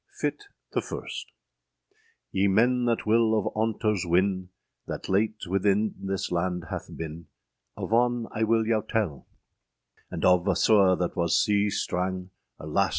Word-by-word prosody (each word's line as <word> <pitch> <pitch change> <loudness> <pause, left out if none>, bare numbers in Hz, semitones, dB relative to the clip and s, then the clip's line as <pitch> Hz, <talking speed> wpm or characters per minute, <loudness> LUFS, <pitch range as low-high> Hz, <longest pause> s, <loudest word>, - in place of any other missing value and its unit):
] - - -20
FITTE 415 - -2 0.3
THE - - 0
FIRSTE. - - -6 1.0
YE 95 +1 +2
men 120 +5 +3
that 115 -1 0
will 110 0 +3
of 105 - -1
aunters 110 -2 0
wynne, 95 +1 +1 0.4
That - - -5
late 105 +3 0
within 100 +3 +1
this 95 -1 -3
lande 90 0 -1
hath - - -5
bin, 80 0 -7 0.5
Of - - -3
on 120 0 +2
I 110 - 0
will 110 0 +2
yow 110 -1 +2
telle; 105 - -2 0.8
And - - -3
of 90 0 +4
a 95 - +3
sewe 100 -3 +5
that 90 -1 -2
was 85 -2 +2
sea 105 0 +2
strang, 90 -1 -2 0.3
Alas! - - 0
100 Hz, 155 wpm, -27 LUFS, 90-110 Hz, 1.0 s, sewe